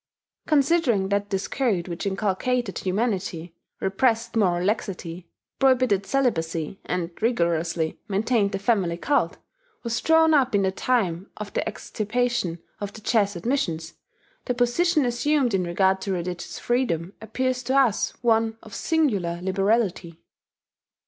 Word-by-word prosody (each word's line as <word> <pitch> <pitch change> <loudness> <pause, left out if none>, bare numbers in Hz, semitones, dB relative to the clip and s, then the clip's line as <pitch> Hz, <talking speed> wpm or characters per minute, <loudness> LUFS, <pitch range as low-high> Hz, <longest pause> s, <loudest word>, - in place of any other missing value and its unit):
Considering 280 - +3
that 200 0 0
this 195 -1 -2
code 215 -11 0
which 170 +2 -4
inculcated 205 +3 -1
humanity, 185 -4 -2 0.3
repressed 230 +4 +1
moral 180 -5 +2
laxity, 180 -4 -3 0.3
prohibited 255 -7 +3
celibacy, 170 - -1
and 180 -1 -2
rigorously 170 -7 0
maintained 210 0 +1
the - - -1
family 195 -5 +1
cult, 215 - 0 0.5
was 235 -1 -2
drawn 320 0 +5
up 260 -6 +3
in 200 - +3
the 190 - +2
time 190 -5 0
of 210 -1 -7
the - - 0
extirpation 220 -3 -2 0.2
of 205 -1 -4
the 220 - -11
Jesuit 205 -5 0
missions, 175 - -1 0.5
the 250 - -1
position 295 +6 +2
assumed 250 +1 +1
in 190 -1 +2
regard 190 +2 +2
to 195 - -3
religious 175 0 -4
freedom 200 -8 -1
appears 255 +3 -1
to 260 +2 0
us 250 -7 +3
one 225 -1 +2
of 215 - -13
singular 205 - 0
liberality. 190 -3 0
205 Hz, 130 wpm, -25 LUFS, 180-245 Hz, 0.5 s, drawn